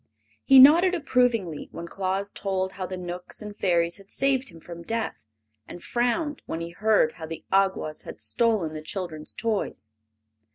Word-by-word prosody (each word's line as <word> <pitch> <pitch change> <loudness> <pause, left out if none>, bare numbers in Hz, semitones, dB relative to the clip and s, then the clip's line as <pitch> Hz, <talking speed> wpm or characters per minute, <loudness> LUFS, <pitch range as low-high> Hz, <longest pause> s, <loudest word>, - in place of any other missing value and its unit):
He 270 - +6
nodded 335 +8 +8
approvingly 245 - 0
when 170 0 -7
Claus 195 +2 -2
told 190 -1 -2
how 185 -1 -5
the 185 - -5
Knooks 180 0 -7
and 210 -1 -8
Fairies 170 -4 +1
had 195 0 -17
saved 265 -2 +1
him 165 -2 -14
from 170 +1 -10
death, 225 - -4 0.4
and 175 - -10
frowned 265 +5 -1
when 165 - -3
he 170 0 -5
heard 205 -3 +3
how 160 -1 -9
the 165 0 -8
Awgwas 190 -5 +1
had - - -10
stolen 220 -9 +1
the 155 - -6
children's 155 -2 -5
toys. 210 - -3
195 Hz, 165 wpm, -26 LUFS, 170-230 Hz, 0.4 s, nodded